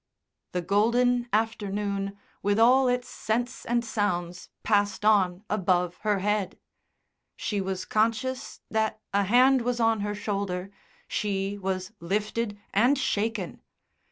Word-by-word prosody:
The 180 -1 -1
golden 240 +5 +2
afternoon, 205 -2 -1 0.2
with 205 +1 +1
all 255 +3 +5
its 250 0 0
scents 240 +3 -3
and 240 0 +1
sounds, 180 -5 -2
passed 205 -1 +1
on 195 -3 +3
above 180 -4 +1
her 210 -2 0
head. 210 -3 0 0.8
She 205 -2 -2
was 190 -1 -3
conscious 230 +5 -1
that 220 0 0
a 200 0 +3
hand 255 +5 +5
was 240 0 -1
on 225 -1 +3
her 205 0 -2
shoulder, 200 -2 -3 0.4
she 200 -1 -1
was 190 +1 -3
lifted 205 +4 -2
and 245 +8 +4
shaken. 215 -6 -2
210 Hz, 125 wpm, -27 LUFS, 195-230 Hz, 0.8 s, all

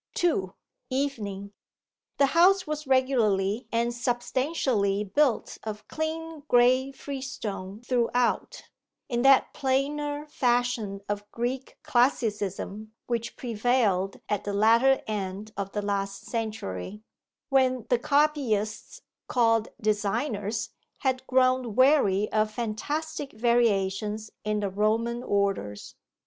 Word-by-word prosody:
2. 195 - 0 0.3
EVENING 210 -8 -3 0.6
The 280 - +5
house 370 +3 +5
was 300 -1 -4
regularly 230 -5 +2
and 235 +1 +1
substantially 240 -4 0
built 255 +4 +1
of 215 -1 -6
clean 320 0 -4
grey 255 +2 +4
freestone 245 -8 -6
throughout, 245 -1 0 0.5
in 240 -2 0
that 270 +1 +5
plainer 290 +2 -1
fashion 245 -7 0
of 205 0 -4
Greek 250 +3 -3
classicism 215 -3 0
which 235 -1 -3
prevailed 220 -5 +1
at 205 -2 -1
the 205 - -3
latter 230 +6 +4
end 205 0 -4
of 195 0 -4
the 210 - -2
last 195 -1 -2
century, 210 - -4 0.5
when 255 -3 +2
the 245 - +4
copyists 255 -8 0 0.2
called 225 -3 +2
designers 215 +1 -1 0.3
had 260 -1 -1
grown 255 -3 +2
weary 255 -7 +4
of 215 0 +2
fantastic 285 +7 -4
variations 215 -2 +1
in 210 0 -1
the 200 - -1
Roman 225 +4 0
orders. 195 - -1
235 Hz, 105 wpm, -27 LUFS, 205-260 Hz, 0.6 s, The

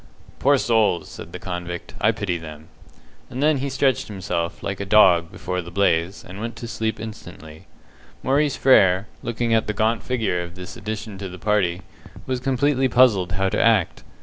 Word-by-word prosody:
"Poor 140 +1 +4
souls!" 110 -8 +1
said - - -10
the - - -6
convict, 90 -1 -6
"I 110 - +4
pity 100 -6 -3
them." 80 -1 -11 0.6
And 130 +3 -3
then 155 -1 +4
he 140 +1 -2
stretched 135 -2 +1
himself, 90 -4 -4
like 100 -1 -3
a - - -2
dog, 90 -5 +5
before 90 0 -4
the 85 - -10
blaze, 90 0 0
and 95 +2 -9
went 115 +1 -4
to 120 - -7
sleep 110 -1 -3
instantly. 85 -8 -10 0.6
Maurice 140 +1 +2
Frere, 95 -7 +5 0.2
looking 120 0 -1
at 110 -1 +2
the 105 - -1
gaunt 110 0 +1
figure 110 -7 -1
of 85 0 -8
this 90 0 -9
addition 110 -2 -6
to 95 -1 -5
the 90 - -9
party, 95 -3 0 0.4
was 130 -1 -2
completely 135 +1 +1
puzzled 105 -8 +4
how 95 +1 +1
to - - 0
act. 110 -7 +2
105 Hz, 180 wpm, -22 LUFS, 90-120 Hz, 0.6 s, dog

